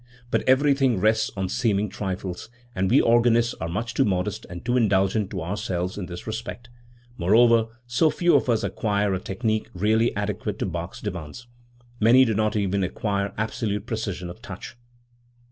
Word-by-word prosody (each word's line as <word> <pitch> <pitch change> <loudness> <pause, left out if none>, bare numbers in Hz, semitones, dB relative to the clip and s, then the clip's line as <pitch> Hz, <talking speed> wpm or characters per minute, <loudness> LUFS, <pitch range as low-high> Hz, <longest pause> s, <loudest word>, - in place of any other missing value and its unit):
But - - +2
everything 135 -4 +3
rests 110 +2 +2
on 95 -1 -1
seeming 105 0 0
trifles, 95 -2 -5 0.2
and 95 -2 0
we - - +5
organists 120 0 +3
are 80 - -2
much 115 +7 -3
too 135 - +3
modest 95 -3 -2
and 85 0 -8
too 120 +1 +1
indulgent 100 -3 +2
to 95 -4 -4
ourselves 90 -1 -3
in 95 -3 -5
this 85 -1 -8
respect; 115 +2 -6 0.5
moreover 115 +5 +5 0.2
so 120 +7 +2
few 175 +2 +2
of 130 - +2
us 115 -2 +2
acquire 100 -2 0
a 95 - -1
technique 110 +3 -2
really 110 +5 +2
adequate 105 0 -3
to - - -2
Bach's 85 +1 -5
demands. 90 +2 -6 0.5
Many 120 +4 +6
do 115 - 0
not 110 +1 0
even 100 -1 0
acquire 100 +1 -2
absolute 110 -1 -2
precision 100 -5 -4
of 90 - -13
touch. - - -9
105 Hz, 165 wpm, -24 LUFS, 95-115 Hz, 0.5 s, Many